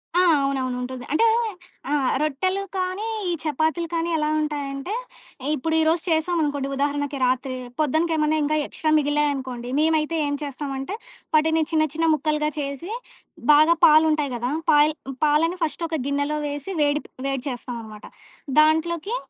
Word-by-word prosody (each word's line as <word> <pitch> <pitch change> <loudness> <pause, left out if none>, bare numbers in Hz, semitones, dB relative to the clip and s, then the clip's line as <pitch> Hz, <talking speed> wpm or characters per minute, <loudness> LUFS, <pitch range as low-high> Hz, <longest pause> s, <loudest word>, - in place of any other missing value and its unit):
ఆ! 360 - +5 0.2
అవునవును. 265 -2 -1
ఉంటుంది. 255 0 -6
అంటే 455 - +4 0.7
ఆహ్, 280 -3 +2
రొట్టెలు 370 +7 0 0.2
కానీ 370 +4 -2 0.2
ఈ - - +1
చపాతీలు 315 +3 0
కానీ 335 +1 0
ఎలా 300 0 0
ఉంటాయంటే, 290 +3 -3 0.6
ఇప్పుడు 320 +3 -1
ఈ 320 - +3
రోజు 325 +1 +2
చేసామనుకోండి. 315 -4 0
ఉదాహరణకి 285 0 -1
రాత్రి. 255 +1 0 0.2
పొద్దునకి 315 +3 +1
ఏమన్నా 305 0 +2
ఇంకా 305 +1 +1
ఎక్స్‌ట్రా 310 - -2
మిగిలాయనుకోండి, 280 -4 -1
మేమైతే 315 +1 +2
ఏం 285 - -1
చేస్తామంటే, 275 +4 -4 0.4
వాటిని 320 +1 +3
చిన్న 310 -1 +3
చిన్న 325 +1 +1
ముక్కలుగా 300 -1 0
చేసి 280 +6 -4 0.6
బాగా 310 +3 +6
పాలుంటాయి 305 -3 +4
గదా! 245 +3 -2 0.2
పాయ్ 295 +1 +5 0.3
పాలని 320 +4 +2
ఫస్ట్ 310 +1 -2
ఒక 325 - -3
గిన్నెలో 285 +2 -1
వేసి, 290 +6 -5
వేడి 290 +1 +2
ప్ - - -15 0.2
వేడి 270 -2 -2
చేస్తాం 245 -1 -6
అనమాట. 215 -1 -11 0.5
దాంట్లోకి 320 +6 +2
300 Hz, 145 wpm, -23 LUFS, 275-320 Hz, 0.7 s, బాగా